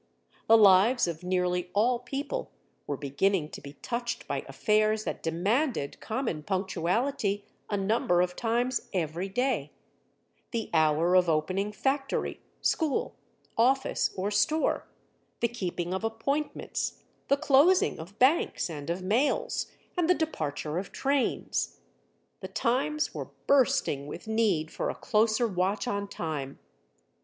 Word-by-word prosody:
The 225 Hz, -, +8 dB
lives 210 Hz, +3 st, +6 dB
of 165 Hz, -1 st, -4 dB
nearly 180 Hz, -1 st, 0 dB
all 235 Hz, +4 st, +3 dB
people 275 Hz, +4 st, -4 dB, 0.4 s
were 145 Hz, -, -2 dB
beginning 150 Hz, +4 st, 0 dB
to -, -, -9 dB
be 140 Hz, -, -10 dB
touched 240 Hz, 0 st, -3 dB
by -, -, -2 dB
affairs 215 Hz, 0 st, +2 dB
that -, -, -4 dB
demanded 190 Hz, -, 0 dB
common 220 Hz, -, -2 dB
punctuality 195 Hz, -, -1 dB, 0.2 s
a 205 Hz, -, 0 dB
number 195 Hz, -3 st, +2 dB
of 180 Hz, 0 st, -1 dB
times 240 Hz, +2 st, 0 dB
every 175 Hz, +1 st, -2 dB
day—the 230 Hz, -, -5 dB
hour 160 Hz, +2 st, +3 dB
of 180 Hz, -2 st, +5 dB
opening 185 Hz, +6 st, 0 dB
factory, 270 Hz, +6 st, -1 dB, 0.2 s
school, 315 Hz, -4 st, 0 dB, 0.4 s
office 265 Hz, +4 st, +2 dB
or 195 Hz, +3 st, -1 dB
store, 295 Hz, +10 st, +1 dB, 0.5 s
the 235 Hz, -, +2 dB
keeping 180 Hz, -6 st, -3 dB
of 190 Hz, -, -3 dB
appointments, 250 Hz, +7 st, -2 dB, 0.2 s
the 280 Hz, -, +3 dB
closing 305 Hz, +6 st, +4 dB
of 180 Hz, +6 st, -10 dB
banks 260 Hz, -, +2 dB
and 145 Hz, -1 st, -6 dB
of 175 Hz, +2 st, -2 dB
mails, 275 Hz, -, +1 dB, 0.3 s
and 350 Hz, -2 st, +1 dB
the 360 Hz, -, +6 dB
departure 155 Hz, -, -2 dB
of 190 Hz, -, -7 dB
trains. 275 Hz, -1 st, -1 dB, 0.6 s
The -, -, -6 dB
times 295 Hz, +6 st, 0 dB
were -, -, -5 dB, 0.2 s
bursting 265 Hz, -, +2 dB
with 150 Hz, -, -8 dB
need 210 Hz, -8 st, +1 dB
for -, -, -2 dB
a -, -, -3 dB
closer 225 Hz, 0 st, +2 dB
watch 195 Hz, +3 st, -1 dB
on 200 Hz, -3 st, -2 dB
time. 150 Hz, -7 st, -4 dB
210 Hz, 130 wpm, -28 LUFS, 175-250 Hz, 0.6 s, The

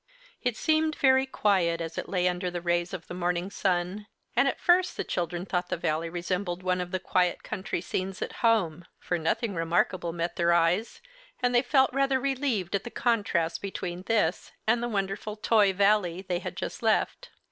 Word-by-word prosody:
It 245 Hz, -3 st, -1 dB
seemed 315 Hz, 0 st, +2 dB
very 265 Hz, 0 st, +4 dB
quiet 185 Hz, -9 st, +1 dB
as 165 Hz, 0 st, -5 dB
it -, -, -5 dB
lay 180 Hz, -2 st, +1 dB
under 180 Hz, 0 st, -1 dB
the 175 Hz, 0 st, -4 dB
rays 175 Hz, 0 st, 0 dB
of 185 Hz, -3 st, -6 dB
the -, -, -8 dB
morning 180 Hz, +1 st, -1 dB
sun, 190 Hz, +2 st, -1 dB, 0.3 s
and 245 Hz, +4 st, +4 dB
at -, -, -1 dB
first 360 Hz, +1 st, +3 dB
the -, -, -1 dB
children 175 Hz, +1 st, -3 dB
thought 180 Hz, -2 st, -2 dB
the -, -, -1 dB
Valley 160 Hz, 0 st, -1 dB
resembled 180 Hz, +1 st, -3 dB
one 180 Hz, 0 st, +1 dB
of 180 Hz, -, -4 dB
the 185 Hz, 0 st, -2 dB
quiet 180 Hz, 0 st, +1 dB
country 195 Hz, -4 st, -3 dB
scenes 185 Hz, +1 st, -3 dB
at -, -, -7 dB
home. 180 Hz, -8 st, +2 dB
For 175 Hz, -, -2 dB
nothing 200 Hz, +7 st, 0 dB
remarkable 170 Hz, +1 st, 0 dB
met 170 Hz, +1 st, -3 dB
their 170 Hz, 0 st, +3 dB
eyes, 170 Hz, -, +1 dB, 0.4 s
and 245 Hz, 0 st, +1 dB
they 240 Hz, -, +5 dB
felt 265 Hz, 0 st, +3 dB
rather 275 Hz, -1 st, +2 dB
relieved 260 Hz, -9 st, -1 dB
at 200 Hz, -, 0 dB
the -, -, -6 dB
contrast 200 Hz, -10 st, 0 dB
between 185 Hz, -2 st, -4 dB
this 210 Hz, -7 st, +1 dB
and 230 Hz, +2 st, +2 dB
the 240 Hz, -, -2 dB
wonderful 200 Hz, 0 st, -2 dB
Toy 215 Hz, -2 st, +3 dB
Valley 195 Hz, -2 st, +2 dB
they 180 Hz, -2 st, -2 dB
had -, -, -6 dB
just -, -, -5 dB
left. -, -, +1 dB
185 Hz, 190 wpm, -28 LUFS, 175-225 Hz, 0.4 s, they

